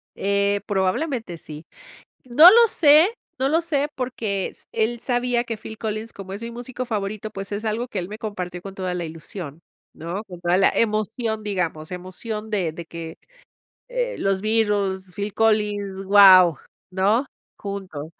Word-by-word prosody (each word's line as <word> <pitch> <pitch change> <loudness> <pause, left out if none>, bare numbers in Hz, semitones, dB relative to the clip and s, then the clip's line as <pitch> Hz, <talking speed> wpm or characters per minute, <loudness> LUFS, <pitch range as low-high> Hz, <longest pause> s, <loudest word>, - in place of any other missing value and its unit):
Eh, 200 0 +1
probablemente 205 - -1
sí. 155 0 -10 0.6
No 300 +8 +9
lo 465 +3 +7
sé, 320 0 +5 0.3
no 265 - +1
lo 320 +4 +3
sé 295 -3 -1
porque 225 -6 -2
s - - -10
él 230 +2 0
sabía 245 -1 0
que 230 -2 -4
Phill 220 +1 -10
Collins, 220 +1 -4
como 190 -1 -9
es 205 +4 -6
mi 235 - -5
músico 245 +1 -6
favorito, 215 -1 -3
pues, 195 0 -7
es 205 +2 -3
algo 225 +3 -2
que 205 - -4
él 175 - -4
me 210 +1 -8
compartió 180 -5 -5
con 195 -1 -8
toda 185 -2 -3
la 175 -1 -3
ilusión, 160 -1 -8 0.3
¿no? 175 +7 -5
Con 180 -4 -11
toda 175 +1 +2
la 190 - +4
emoción, 220 0 -1
digamos, 180 -6 -3
emoción 210 +5 -6
de 185 -7 0
de 170 +1 -8
que, 165 0 -8 0.7
eh, - - -2
los 195 -1 0
Beatles, 205 -4 0
Phill 205 0 -4
Collins, 210 -3 +1
guau, 190 -5 +8 0.3
¿no?, 205 +8 +2 0.3
juntos. 190 -7 -6
205 Hz, 165 wpm, -23 LUFS, 185-230 Hz, 0.7 s, No